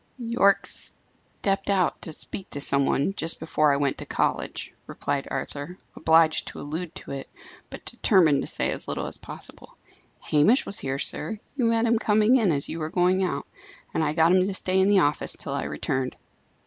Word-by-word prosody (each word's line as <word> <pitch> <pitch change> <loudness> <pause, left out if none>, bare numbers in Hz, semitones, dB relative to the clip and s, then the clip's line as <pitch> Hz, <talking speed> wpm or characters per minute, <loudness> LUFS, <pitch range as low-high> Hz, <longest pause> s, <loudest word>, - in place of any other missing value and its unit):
"Yorke 230 -5 +2
stepped 195 0 -1
out 190 -3 +1
to 160 - -2
speak 190 +4 -6
to 145 - -4
some 140 -1 +1
one 145 +8 +1
just 165 -4 +2
before 155 -2 +2
I 140 - +2
went 140 -1 -1
to - - -6
college," - - -2
replied 135 -1 -3
Arthur, 145 +5 -5 0.2
obliged 160 0 +3
to - - -7
allude 160 +3 -5
to - - -8
it, 135 -1 -6 0.4
but - - -10
determined 165 -9 +3
to - - -4
say - - -1
as - - -5
little - - -3
as - - -5
possible. - - -8 0.4
"Hamish 155 - +3
was 200 - -3
here, 135 0 -2
sir; 220 +9 -2 0.2
you 255 -4 0
met 230 0 +2
him 230 -1 +2
coming 215 +3 +4
in 215 -8 +2
as 140 -2 -1
you 165 - -5
were 155 0 -3
going 180 +2 +2
out, 185 - -2 0.5
and 160 - +1
I 150 -1 0
got 165 +1 +4
him 185 0 +5
to 200 - -2
stay 185 0 +2
in 190 - +3
the 200 -2 +5
office 145 +1 +1
till - - -5
I - - -2
returned." 130 -1 -2
175 Hz, 200 wpm, -25 LUFS, 145-200 Hz, 0.5 s, him